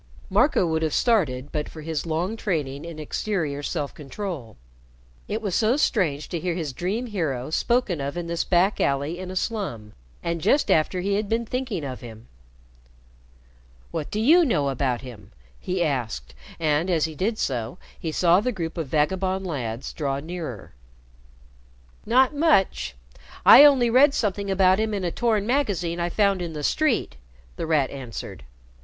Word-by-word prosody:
Marco 280 - +3
would 160 -1 0
have 160 -2 0
started 150 - +1
but 150 -1 -3
for 155 - -10
his 160 +1 -3
long 170 +7 -1
training 150 -9 -3
in 170 -2 -8
exterior 155 -2 -2
self 145 -1 -3
control. 150 - -7 0.7
It 220 +2 -3
was 200 -4 -2
so 225 +7 +2
strange 165 - +1
to 170 - -3
hear 175 0 -2
his 155 -6 -3
dream 195 - -2
hero 155 - -3
spoken 215 - +1
of 140 +4 -4
in 175 - -3
this 170 0 -1
back 185 +3 +2
alley 140 +5 0
in 185 0 -6
a 185 - -6
slum, 185 - -3 0.3
and 170 -1 -2
just 275 - +3
after 170 +4 +2
he 200 +2 0
had 205 0 -1
been 230 +1 0
thinking 240 - -3
of 130 -2 -6
him. 115 -1 -11 1.6
"What 150 - -4
do 210 - -3
you 320 +11 +6
know 150 - +1
about 130 -2 -1
him?" 120 -5 -12 0.3
he 180 -1 -1
asked, 115 - -3 0.3
and, 155 +2 +1
as 165 -4 +2
he 160 - -5
did 210 +8 -1
so, 125 - -2 0.2
he 165 - -3
saw 175 +3 +4
the 250 - 0
group 170 -5 -4
of 160 - -3
vagabond 190 +6 0
lads 125 -7 -4
draw 140 -3 -2
nearer. 155 - -7 1.3
"Not 260 +5 +4
much. 195 - +2 0.5
I 280 - +11
only 265 -5 +6
read 275 +4 +5
something 200 -2 -1
about 190 0 +4
him 215 -1 0
in 195 - -3
a 175 - -1
torn 220 -2 +1
magazine 200 -10 0
I 170 0 0
found 200 0 +2
in 170 -2 -4
the 150 -1 -5
street," 255 - +1 0.4
The - - -4
Rat 150 -5 +2
answered. 125 - -7
170 Hz, 170 wpm, -24 LUFS, 145-210 Hz, 1.6 s, I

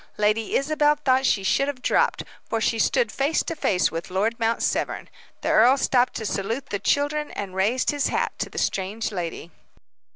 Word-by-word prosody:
Lady 210 +1 +1
Isabel 295 +1 +2
thought 265 -3 +2
she 195 - +1
should 275 +8 +2
have 265 -3 -5
dropped, - - +1 0.3
for 225 - 0
she 225 +1 0
stood 235 0 +2
face 280 +4 0
to 330 - -4
face 185 -11 +1
with 165 +2 -5
Lord 215 +6 -1
Mount 230 0 0
Severn. - - -2 0.3
The - - -2
earl 245 +5 +5
stopped 255 -2 +2
to 220 - -4
salute 220 +6 -3
the 200 - -1
children, 290 +8 0
and 195 -2 -6
raised 210 +7 +1
his 290 -1 0
hat - - 0
to - - -2
the - - -12
strange 200 +4 -2
lady. 175 -2 -5
230 Hz, 190 wpm, -24 LUFS, 200-275 Hz, 0.3 s, earl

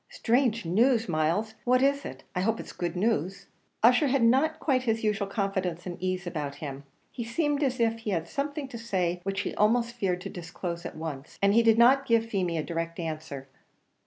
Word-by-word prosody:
"Strange 235 -3 +1
news, 230 +6 +3
Myles! 170 +7 0
what 255 +1 +3
is 280 +1 +2
it? - - -8
I 180 - 0
hope 225 +4 0
it's - - -8
good 175 0 -3
news." 195 -2 0 0.4
Ussher 245 +5 +6
had 265 -2 +2
not 280 +7 +3
quite 265 -5 +1
his 225 -3 -1
usual 210 -1 0
confidence 190 -4 -2
and 175 -1 -6
ease 185 0 -2
about 150 -5 -4
him; 140 -1 -7 0.3
he 240 - -5
seemed 290 +5 0
as 260 -3 0
if 230 -1 +1
he 225 - -5
had 170 -4 -1
something 285 - -3
to 235 - -7
say 180 -6 -1
which 195 +2 -2
he - - -4
almost 235 +3 +2
feared 185 -6 -1
to 195 - -6
disclose 170 0 -5
at - - -10
once, 150 -4 -7
and 200 0 +3
he 230 - +6
did 225 -1 +4
not 265 +3 +5
give 230 -1 +3
Feemy 185 -6 -1
a 155 - -1
direct 165 0 -4
answer. 155 -4 -5
205 Hz, 205 wpm, -28 LUFS, 175-235 Hz, 0.4 s, Ussher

